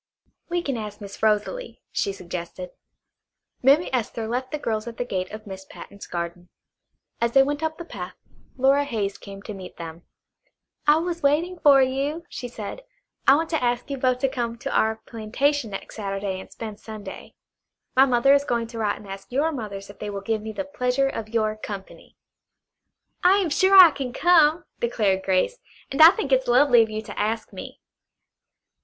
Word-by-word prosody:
"We 345 0 -1
can 275 -6 -2
ask 210 -2 -6
Miss 200 -2 -10
Rosalie," 220 - 0
she 200 - 0
suggested. 180 -1 -7 0.9
Mammy 280 +7 +5
Esther 230 -2 -2
left 250 +3 -2
the 300 - -3
girls 220 -5 -2
at 230 - -7
the 245 - -2
gate 185 -5 -3
of 215 +1 -9
Miss 190 -2 -8
Patten's 200 +1 -11
garden. 175 0 -5 0.7
As 235 0 +1
they 270 - +7
went 290 +2 -2
up 315 0 -2
the 340 - -7
path 180 - -7 0.4
Flora 270 +2 +3
Hayes 215 -8 -3
came 195 -1 -10
to 215 - -6
meet 190 -2 -10
them. 165 0 -8 0.9
"I 295 - +7
was 340 +1 -2
waiting 325 +5 +1
for 280 -4 +6
you," 280 +6 -2
she 245 - -6
said. 230 - -7 0.5
"I 270 - +8
want 320 +2 -1
to 320 -5 0
ask 245 +3 -1
you 275 - -2
both 255 -1 +2
to 270 - +3
come 240 -3 -2
out 230 - -15
to - - -3
our 220 0 +3
plantation 240 +4 -1
next 195 +2 -8
Saturday 195 -2 -3
and - - -11
spend 215 -2 -7
Sunday. 215 -4 -9 0.6
My 265 +1 +6
mother 255 +2 +4
is 280 0 +4
going 235 -4 -1
to 230 -1 -7
write 210 -2 0
and 205 - -13
ask 195 +3 -9
your 290 +6 +1
mothers 205 -7 -6
if - - -21
they 210 - -4
will 200 -1 -5
give 220 +1 -1
me 220 +1 -6
the 285 +7 -4
pleasure 270 -1 0
of 220 -4 -5
your 215 -1 0
company." 200 -2 -9 1.1
"I 370 +2 +6
am 370 -6 0
sure 380 +5 +4
I 360 -4 +11
can 260 -4 -5
come," 335 0 +4
declared 210 -5 +1
Grace, 190 - +1 0.3
"and 275 - +1
I 320 - +12
think 345 -7 -2
it's 260 0 +3
lovely 245 0 +6
of 225 - +1
you 215 0 -4
to - - -8
ask 220 +2 -2
me." - - -9
235 Hz, 195 wpm, -24 LUFS, 205-285 Hz, 1.1 s, I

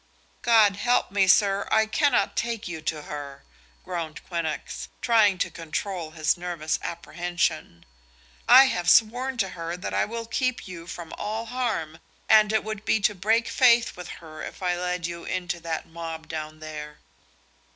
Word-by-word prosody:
"God 220 -4 +5
help 245 0 +1
me, 195 -1 +3
sir, 200 +1 +4
I 220 0 +4
cannot 280 +4 +1
take 230 -2 -2
you 165 -2 -6
to 155 -1 -3
her," 140 -2 -7 0.4
groaned 165 -3 -5
Quinnox, 170 -3 -4
trying 215 -5 +4
to - - -1
control 170 +1 -4
his 155 -1 +1
nervous 175 -3 -3
apprehension. 170 - -3 0.6
"I 270 - +10
have 175 -9 0
sworn 245 +7 +3
to 195 -5 0
her 170 -1 -5
that 180 - -5
I - - +2
will 230 +1 -5
keep 255 +1 -1
you 170 -2 -9
from 170 -1 -8
all 220 +2 -3
harm, 220 -11 -3 0.3
and 215 -1 +6
it 220 - +1
would 215 -1 -5
be 220 - +2
to 210 - +3
break 220 +5 +1
faith 240 -2 +4
with 180 -2 -8
her 155 -2 -10
if - - -8
I 180 -1 +1
led 180 -1 -2
you 170 0 -5
into 175 -1 -3
that 165 -1 -4
mob 165 -1 -7
down 155 -1 -6
there." 150 -1 -7
180 Hz, 165 wpm, -25 LUFS, 165-220 Hz, 0.6 s, I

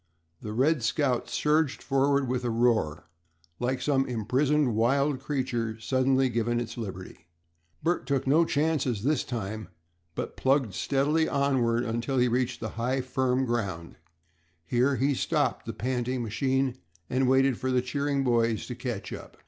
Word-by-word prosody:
The 105 - -5
"Red 135 +6 +2
Scout" 125 +1 0
surged 150 +4 +1
forward 140 0 +2
with 125 0 -1
a 120 - 0
roar, 115 -11 +1 0.5
like 125 +1 -1
some 135 -2 +2
imprisoned 130 +4 +1
wild 135 +5 +2
creature 125 -5 -2
suddenly 130 +2 +2
given 120 0 0
its 115 -1 -5
liberty. 95 -6 -8 0.6
Bert 175 +2 0
took 140 -2 0
no 150 +5 +4
chances 145 -9 0
this 145 +1 +1
time, 110 -3 -5 0.5
but - - -4
plugged 135 -6 +1
steadily 145 - +1
onward 125 -4 +1
until 120 +3 -2
he 125 0 +4
reached 125 0 -1
high, 120 +4 -1
firm 130 0 0
ground. 100 -9 -3 0.7
Here 125 +9 +2
he 135 +4 +1
stopped 140 -4 0
the - - -2
panting 125 0 -2
machine, 130 +3 0 0.3
and 130 0 +1
waited 130 -1 +3
for 130 - -2
the 125 -1 +2
cheering 140 +1 -1
boys 115 -3 +1
to 125 - -5
catch 120 -4 -5
up. - - -10
130 Hz, 150 wpm, -28 LUFS, 115-135 Hz, 0.7 s, no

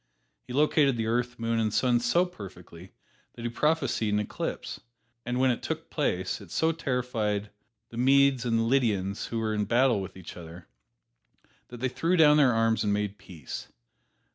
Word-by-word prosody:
He - - -8
located 140 -1 +3
the 115 - -1
earth, 120 +2 -1
moon 115 0 -1
and 110 -1 +1
sun 120 +2 +2
so 170 +10 +2
perfectly 95 - -11 0.4
that 115 - -9
he 120 - -1
prophesied 150 -3 0
an - - +2
eclipse, 105 - -4 0.5
and 125 +1 -1
when 130 0 +4
it 120 - -3
took - - -5
place 90 +2 -1
it 100 - -12
so 160 - +1
terrified 120 -9 -2 0.4
the 115 - -10
Medes 135 0 +4
and 115 -2 +1
the 115 - +2
Lydians, 110 -6 0
who 115 - -4
were 110 -1 -1
in 105 -1 0
battle 120 -2 +3
with 95 0 -8
each 95 - -10
other, 85 0 -11 1.0
that 120 -1 -11
they 130 - +1
threw 165 +7 0
down 150 -2 +6
their 140 -4 +5
arms 115 0 +2
and 105 - +1
made 105 0 -2
peace. 80 -8 -8
115 Hz, 180 wpm, -28 LUFS, 105-130 Hz, 1.0 s, down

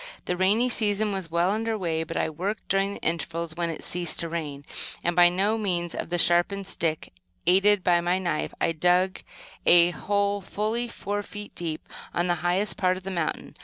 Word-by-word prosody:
The 180 - -1
rainy 200 +7 +3
season 215 -3 +1
was 190 -4 -4
well 170 +3 +2
under 220 +1 -1
way; 165 -4 -1
but - - -5
I - - +1
worked 185 +7 -4
during 195 +1 +1
the - - -10
intervals 165 0 -2
when 170 0 -1
it 165 - -6
ceased 175 -1 -1
to 170 - -4
rain, 150 -4 -5 0.4
and, 175 0 0
by 175 0 +7
means 190 -2 0
of - - -5
a 175 - +1
sharpened 175 +4 +3
stick, 160 - -2 0.3
aided 195 +2 +4
by 175 -1 +4
my 175 +1 +1
knife, 175 -5 -2
I - - +2
dug 180 +3 +2 0.5
a 175 0 +7
hole 200 +2 0
fully 220 +5 -2
four 205 -3 -3
feet 205 0 -9
deep, 160 -3 -5 0.3
on 175 - +1
the 175 - +2
highest 180 +4 +1
part 185 -1 +2
of 185 - -10
the 195 - -4
mountain. 170 -4 -3
180 Hz, 195 wpm, -26 LUFS, 170-200 Hz, 0.5 s, by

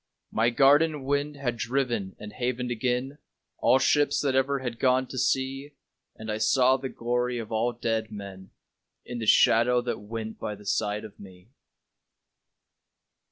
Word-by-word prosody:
My 115 +2 +2
garden 145 +4 +4
wind 145 +2 -1
had 120 -4 -2
driven 120 -6 -2
and 105 0 -9
havened 125 0 -2
again 125 +4 -2 0.4
All 130 - +4
ships 145 +2 +2
that 140 -2 0
ever 135 +1 +2
had 125 -3 -5
gone 130 0 +3
to 130 - -9
sea, 135 +3 -1 0.4
And 110 0 -6
I 105 - -3
saw 130 +4 +4
the 130 0 -5
glory 125 +1 -1
of 115 -2 -6
all 115 +2 +1
dead 115 -2 -2
men 100 -2 -9 0.6
In 120 -1 -6
the 110 - -4
shadow 120 +4 +5
that 120 0 -3
went 110 +1 -7
by 105 - -4
the 105 0 -16
side 105 +1 -1
of 105 - -13
me. 95 0 -14
120 Hz, 160 wpm, -27 LUFS, 110-130 Hz, 0.6 s, shadow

